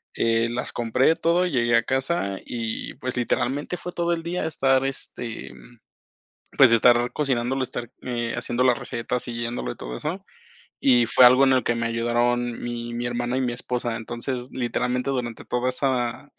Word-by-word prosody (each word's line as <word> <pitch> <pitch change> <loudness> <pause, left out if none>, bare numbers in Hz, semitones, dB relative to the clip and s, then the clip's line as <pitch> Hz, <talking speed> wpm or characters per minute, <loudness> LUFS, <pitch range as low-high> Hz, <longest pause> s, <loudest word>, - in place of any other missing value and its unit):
eh, 115 0 +2
las 120 +1 -4
compré 125 +7 +2
todo, 170 +2 +2
llegué 120 -7 +2
a 115 - +2
casa 130 - -1
y, 115 -2 -4
pues, 130 -1 -4
literalmente 140 +7 -1
fue 180 - -6
todo 170 0 0
el 165 -1 -3
día 175 +2 -2
estar, 135 -4 +2
este, 125 -3 -5
mm, 120 - -16 0.8
pues, 130 -4 +8
estar 120 +1 +4
cocinándolo, 130 -2 0
estar, 120 -2 -5
eh, 120 -2 -2
haciendo 120 +1 -1
la 125 -1 +4
receta, 120 +1 -3
siguiéndolo 120 - -4
y - - -22
todo - - -6
eso. 180 +6 -4 0.6
Y 125 -3 +5
fue 125 - +7
algo 130 +2 +7
en 135 - +4
el 130 - +2
que 120 - 0
me 115 0 -1
ayudaron 120 +1 0
mi 120 0 -4
mi 120 +1 -3
hermana 120 +1 -2
y - - +1
mi 125 -2 -1
esposa. 120 -1 -3
Entonces, 120 +2 -5
literalmente 125 +1 -1
durante 120 -3 -4
toda 125 +1 0
esa 130 +1 -1
125 Hz, 175 wpm, -24 LUFS, 120-130 Hz, 0.8 s, pues